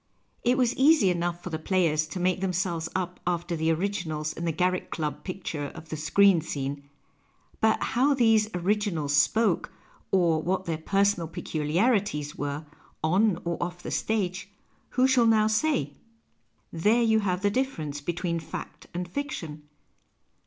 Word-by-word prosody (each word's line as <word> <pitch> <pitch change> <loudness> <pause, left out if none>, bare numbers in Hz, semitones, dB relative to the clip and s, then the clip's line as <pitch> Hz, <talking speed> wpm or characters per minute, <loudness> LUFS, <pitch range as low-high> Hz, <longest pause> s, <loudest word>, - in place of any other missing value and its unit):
It 250 +2 +3
was 250 -2 +2
easy 275 - +5
enough 175 0 -2
for 180 - -6
the 160 - -3
players 160 -3 +1
to 180 - -6
make 185 +1 +1
them 190 -1 0
selves 170 -2 -1
up 180 -1 -2
after 175 0 -1
the 160 0 +1
originals 165 -4 -2
in 170 - -5
the 165 - +1
Garriek 180 +3 0
Club 150 -3 -4
picture 175 -6 -4
of 160 -1 -11
the - - -3
screen 175 +3 +4
scene, 140 -2 -5 0.7
but 220 0 +3
how 270 +5 +2
these 225 -4 +4
originals 180 -6 0
spoke 210 +4 +2 0.4
or 170 -4 +3
what 185 +3 -1
their 160 -2 -2
personal 195 0 +1
peculiarities 165 - 0
were, 145 +2 -4 0.4
on 185 +3 +3
or 170 0 -2
off 175 0 -4
the - - -5
stage, 195 -3 -1 0.5
who 255 - +5
shall 250 -3 +4
now 220 -1 +4
say? 215 - +1 0.8
There 210 +8 +3
you 220 -1 +4
have 185 -2 -1
the 205 - +3
difference 160 - -2
between 170 +2 -2
fact 160 - -8
and 180 0 -3
fiction. 165 - -5
180 Hz, 155 wpm, -27 LUFS, 160-210 Hz, 0.8 s, easy